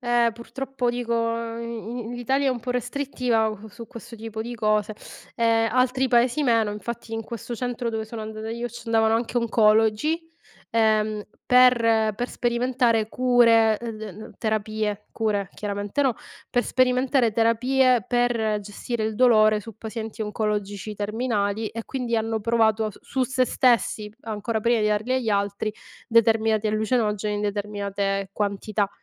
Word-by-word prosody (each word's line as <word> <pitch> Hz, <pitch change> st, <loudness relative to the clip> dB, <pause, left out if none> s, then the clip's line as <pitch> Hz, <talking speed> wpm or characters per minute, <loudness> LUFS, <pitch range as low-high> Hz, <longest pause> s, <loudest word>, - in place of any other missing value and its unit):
Eh, 240 Hz, -2 st, +2 dB
purtroppo 250 Hz, +2 st, -3 dB
dico, 240 Hz, -1 st, -3 dB, 0.5 s
i 235 Hz, 0 st, -5 dB
in 240 Hz, +2 st, -6 dB
l'Italia 265 Hz, +3 st, 0 dB
è -, -, +4 dB
un 245 Hz, -2 st, -3 dB
po' 250 Hz, -, -4 dB
restrittiva 250 Hz, -3 st, 0 dB, 0.2 s
su 225 Hz, +2 st, -11 dB
questo 235 Hz, 0 st, -10 dB
tipo 220 Hz, 0 st, -7 dB
di 240 Hz, +1 st, -6 dB
cose. 215 Hz, -1 st, 0 dB, 0.4 s
Ehm, 225 Hz, -1 st, +2 dB
altri 255 Hz, +1 st, +2 dB
Paesi 245 Hz, +4 st, +2 dB
meno, 230 Hz, -4 st, +3 dB
infatti 225 Hz, +2 st, -6 dB
in 225 Hz, -, -2 dB
questo 235 Hz, 0 st, -6 dB
centro 245 Hz, -1 st, -3 dB
dove 220 Hz, -1 st, -3 dB
sono 220 Hz, 0 st, -7 dB
andata 215 Hz, 0 st, -6 dB
io 235 Hz, +1 st, -3 dB
ci 240 Hz, +1 st, -10 dB
andavano 225 Hz, 0 st, +3 dB
anche 240 Hz, +1 st, -3 dB
oncologi, 225 Hz, +7 st, +3 dB, 0.5 s
ehm, 215 Hz, -2 st, +2 dB, 0.2 s
per 230 Hz, -4 st, +4 dB
per 245 Hz, +3 st, -3 dB
sperimentare 240 Hz, -2 st, +1 dB
cure, 230 Hz, -3 st, +4 dB
uhm, 235 Hz, -1 st, -4 dB
d 215 Hz, -, -10 dB
n 215 Hz, +4 st, -11 dB
terapie 215 Hz, -1 st, -2 dB
cure 205 Hz, -4 st, -1 dB
chiaramente 205 Hz, +4 st, -3 dB
no. 260 Hz, -4 st, +2 dB, 0.3 s
Per 245 Hz, -, +1 dB
sperimentare 255 Hz, -2 st, +2 dB
terapie, 245 Hz, +1 st, +3 dB
per 230 Hz, -3 st, +1 dB
gestire 215 Hz, +3 st, -5 dB
il 215 Hz, -1 st, -2 dB
dolore 215 Hz, -4 st, +5 dB
su 220 Hz, +1 st, -10 dB
pazienti 220 Hz, 0 st, -6 dB
oncologici 210 Hz, -1 st, -3 dB
terminali 210 Hz, 0 st, -1 dB
e 230 Hz, 0 st, -6 dB
quindi 250 Hz, -3 st, -3 dB
hanno 225 Hz, 0 st, -1 dB
provato 220 Hz, 0 st, +2 dB
as 215 Hz, -, -6 dB
su 260 Hz, -1 st, -1 dB
se 260 Hz, 0 st, +1 dB
stessi, 230 Hz, -4 st, +2 dB
ancora 220 Hz, 0 st, -3 dB
prima 235 Hz, +1 st, +2 dB
di 210 Hz, -, +2 dB
darli 215 Hz, +4 st, 0 dB
agli 255 Hz, -3 st, -1 dB
altri, 200 Hz, +1 st, 0 dB, 0.3 s
determinati 225 Hz, -2 st, +3 dB
allucinogeni 215 Hz, -1 st, 0 dB
in 205 Hz, -, -2 dB
determinate 200 Hz, -1 st, -2 dB
quantità. 205 Hz, 0 st, -1 dB
225 Hz, 150 wpm, -24 LUFS, 215-240 Hz, 0.5 s, dolore